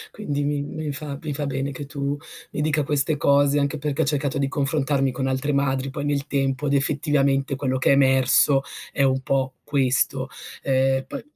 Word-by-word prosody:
quindi 145 -9 -3
mi 145 0 -1
mi 150 0 -5
fa 140 -1 -4
mi 150 -2 -4
fa 145 +1 -2
bene 135 +1 -2
che 140 +2 -7
tu 140 0 -3 0.4
mi - - -3
dica 150 -1 +1
queste 145 +1 +1
cose, 140 0 +3
anche 140 +1 0
perché 145 -1 -1
ho - - +2
cercato 140 -2 0
di 140 0 0
confrontarmi 140 -1 0
con 130 +2 -2
altre 135 +2 -1
madri 135 -1 0
poi 140 +2 -5
nel 140 -1 -1
tempo 135 0 -1
ed 140 - 0
effettivamente 140 -1 +2
quello 130 -1 -1
che - - +2
è - - +7
emerso 135 0 +4 0.3
è 140 - 0
un 130 -1 +2
po' 130 0 -1
questo. 135 -1 +1 0.3
Ehm, 135 0 +1
poi - - -6
140 Hz, 195 wpm, -23 LUFS, 135-145 Hz, 0.4 s, è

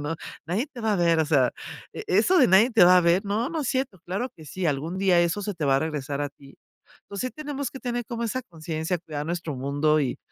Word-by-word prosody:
¿no?, 150 +3 -3 0.3
nadie 195 - -1
te 245 - -8
va 220 -1 +1
a - - 0
ver, 170 -2 +3
o 160 - +2
sea, 140 -5 +3 0.4
e 440 - -7
eso 370 -3 +4
de 260 - +6
nadie 195 +7 +6
te 220 -7 +6
va 180 +1 +7
a - - +3
ver. 170 +4 +3
No, 215 +6 -1
no 325 -2 -2
es 255 - -2
cierto, 260 -9 -2
claro 195 +8 -2
que 160 - -13
sí, 180 +5 -3
algún 160 +5 -2
día 185 -3 +4
eso 175 +4 0
se 205 0 -3
te 165 -3 -3
va 135 -1 +4
a - - +3
regresar 145 -3 -3
a 145 - -2
ti. 140 -1 -17 0.5
Entonces, 200 +5 -4
sí - - -15
tenemos 285 -3 -4
que 265 - -9
tener 245 -1 -2
como 235 -1 -4
esa 255 +3 -2
conciencia, 160 0 -4
cuidar 150 -3 -6
nuestro 170 -3 -3
mundo 145 +4 +1
y 135 -4 -2
175 Hz, 260 wpm, -25 LUFS, 155-230 Hz, 0.5 s, va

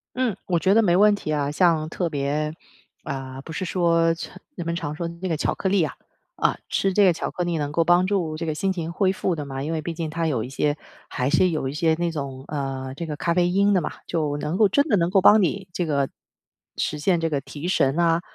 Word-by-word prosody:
嗯， 250 -6 0
我 175 -2 +1
觉 190 +5 +3
得 225 - +5
没 180 -4 +3
问 210 +1 +6
题 160 -6 -4
啊。 145 -1 0
像 160 -2 +2
特 170 +1 -2
别 150 +1 -1 0.5
啊， 135 -2 -5
不 160 - -9
是 185 - -3
说 165 -1 +2
常 165 - -9 0.2
人 175 - -5
们 170 - -1
常 150 -3 -4
说 170 - -3
的 170 - -6
那 185 - -1
个 160 - 0
巧 - - 0
克 190 - -2
力 190 -4 +3
啊， - - -3 0.4
啊， - - 0
吃 195 - +1
这 205 +2 +4
个 185 - +6
巧 - - -4
克 180 - -3
力 175 -1 -1
能 145 -1 -2
够 165 +3 +1
帮 175 +2 +4
助 170 -6 0
这 165 - -4
个 160 - -1
心 190 +5 0
情 170 -2 -4
恢 190 +1 +2
复 185 -3 -1
的 145 -2 -5
嘛， 135 0 -5
因 155 +3 -3
为 160 - -1
毕 165 +2 -4
竟 160 -1 -4
它 165 +1 -1
有 130 -8 0
一 125 - -6
些 145 +2 0 0.3
还 125 +2 -1
是 170 +4 +4
有 155 -5 -2
一 135 - -4
些 160 +2 +2
那 170 +1 -1
种， 135 -4 -5
呃， 135 -2 -4
这 170 - -4
个 155 - -4
咖 170 +3 0
啡 175 -1 +3
因 200 +2 +3
的 185 - +3
嘛， 155 - -4 0.2
就 150 -4 -1
能 150 +4 -2
够 210 0 +5
真 285 +7 +3
的 210 - +3
能 170 0 +1
够 195 - +4
帮 210 +3 +7
你 190 +1 -1
这 175 -1 -2
个 140 -3 +1 0.7
实 150 - -2
现 170 +3 +2
这 165 0 0
个 145 -2 0
提 145 +4 -7
神 135 -5 +2
啊， 170 -1 +3
165 Hz, 285 characters per minute, -24 LUFS, 150-180 Hz, 0.7 s, 帮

